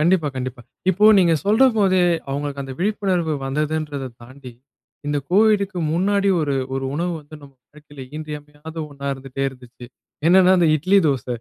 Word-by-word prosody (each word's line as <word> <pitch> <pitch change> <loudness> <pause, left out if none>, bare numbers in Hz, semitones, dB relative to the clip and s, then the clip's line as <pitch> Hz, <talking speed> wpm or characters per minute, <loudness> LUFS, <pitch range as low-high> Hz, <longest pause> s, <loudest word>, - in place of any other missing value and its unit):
கண்டிப்பா 165 -1 +2
கண்டிப்பா. 130 -1 -5 0.3
இப்போ 195 +3 +1
நீங்க 170 -3 +4
சொல்றபோதே 210 -4 +3 0.3
அவங்களுக்கு 140 0 -3
அந்த 135 - -7
விழிப்புணர்வு 185 -4 0
வந்ததுன்றத 150 -1 -2 0.2
தாண்டி, 130 +1 -12 0.5
இந்த 145 0 0
கோவிடுக்கு 200 -1 +3
முன்னாடி 200 +3 +1
ஒரு 145 -3 -1 0.2
ஒரு 135 - -3
உணவு 175 +3 -1
வந்து 150 +1 -15
நம்ம 140 -1 -14 0.2
வாழ்க்கையில 150 -2 -13
இன்றியமையாத 150 0 -9 0.2
ஒண்ணா 140 0 -8
இருந்துட்டே 135 0 -6
இருந்துச்சு. 125 -2 -13 0.4
என்னென்னா 185 +1 +6
அந்த 170 -2 +3
இட்லி 185 +7 +3
தோச. 135 -5 -1
155 Hz, 140 wpm, -21 LUFS, 140-185 Hz, 0.5 s, என்னென்னா